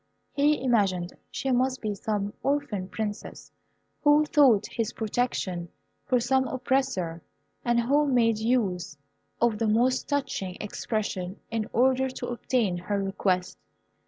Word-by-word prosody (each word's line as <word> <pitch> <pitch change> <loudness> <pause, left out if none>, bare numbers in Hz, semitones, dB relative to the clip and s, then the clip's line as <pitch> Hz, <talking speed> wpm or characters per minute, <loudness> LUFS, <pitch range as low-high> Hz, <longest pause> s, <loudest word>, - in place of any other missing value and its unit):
He 290 -1 +2
imagined 195 -8 +1 0.2
she 270 - -2
must 255 +1 +1
be 215 -2 -2
some 205 0 -2
orphan 275 -10 -1
Princess, 210 -1 -5 0.5
who 295 0 +5
sought 250 -9 +6
his 230 -2 -3
protection 205 -6 -2 0.4
from 250 -2 +2
some 260 +2 +2
oppressor, 255 -10 -1 0.4
and 240 0 +2
who 285 +5 +3
made 230 -4 +3
use 205 -9 0 0.4
of 235 -3 +2
the 225 - +1
most 245 +4 +2
touching 195 -10 -2
expression 205 -3 -3
in 225 -1 -2
order 260 +2 +3
to 260 - -6
obtain 235 -6 0
her 200 +3 -2
request. 195 -2 -1
230 Hz, 130 wpm, -27 LUFS, 200-260 Hz, 0.5 s, sought